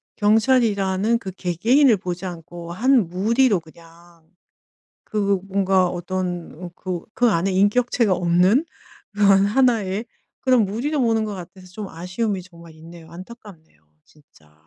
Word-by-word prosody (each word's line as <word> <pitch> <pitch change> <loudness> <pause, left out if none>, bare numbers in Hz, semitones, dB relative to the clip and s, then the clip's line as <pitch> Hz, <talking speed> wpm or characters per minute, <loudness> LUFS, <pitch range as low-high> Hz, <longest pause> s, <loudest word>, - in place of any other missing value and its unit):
경찰이라는 215 -1 +2
그 190 -4 -7
개개인을 220 - +2
보지 180 0 -6
않고 170 -1 -8
한 240 +1 +2
무리로 215 +4 +2
그냥 165 +1 -19 0.8
그 200 -2 -1
뭔가 190 -1 +2
어떤 175 -1 -5
그 185 -2 -5
그 245 -1 +3
안에 185 0 0
인격체가 210 +3 +2
없는 180 - +2 0.5
그런 200 -1 +4
하나의 220 -3 +1 0.4
그런 255 -4 +3
무리로 250 +10 -2
보는 225 -3 +1
것 210 - -5
같아서 185 0 -11
좀 200 +1 -8
아쉬움이 185 +4 -3
정말 170 -2 -15
있네요. 165 +1 -14
안타깝네요, 185 - -13 0.3
진짜. 80 - -25
190 Hz, 280 characters per minute, -21 LUFS, 175-220 Hz, 0.8 s, 그런